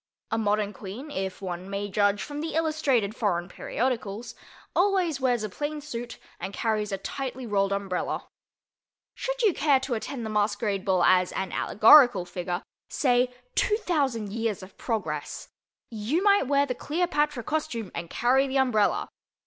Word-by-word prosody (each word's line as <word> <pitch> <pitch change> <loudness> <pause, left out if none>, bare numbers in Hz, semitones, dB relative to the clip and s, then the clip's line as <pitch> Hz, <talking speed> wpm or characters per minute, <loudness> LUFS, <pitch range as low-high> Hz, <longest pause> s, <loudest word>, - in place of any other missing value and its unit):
A 225 - +1
modern 210 -1 +1
Queen 215 +10 -8
(if 190 -4 -4
one 180 0 -5
may 200 +1 -3
judge 205 0 +1
from 290 0 -5
the 320 0 -4
illustrated 290 -10 +1
foreign 175 -7 0
periodicals) 235 +1 -3 0.4
always 360 -6 +2
wears 245 -4 +2
a - - -1
plain 295 +8 -4
suit 240 -5 -6 0.2
and 195 - -5
carries 215 -2 -1
a 195 - -1
tightly 260 +5 -5
rolled 200 -3 +1
umbrella. 195 -2 -2 0.9
Should - - -3
you 415 -5 +5
care 285 -3 +3
to 265 -1 -2
attend 235 +1 -4
the - - -3
masquerade 205 -1 0
as 185 0 +4
an 190 -1 -3
allegorical 220 -3 +6
figure—say 200 +8 -1 0.2
"2000 280 - 0
Years 225 -4 -2
of 185 - -13
Progress"—you 220 - -4
might 405 -8 +4
wear 280 0 +3
the 255 - -2
Cleopatra 295 -2 -1
costume 300 -9 -3
and 170 0 -5
carry 260 +3 +2
the 270 +1 -1
umbrella. 245 -6 +2
230 Hz, 145 wpm, -27 LUFS, 200-280 Hz, 0.9 s, allegorical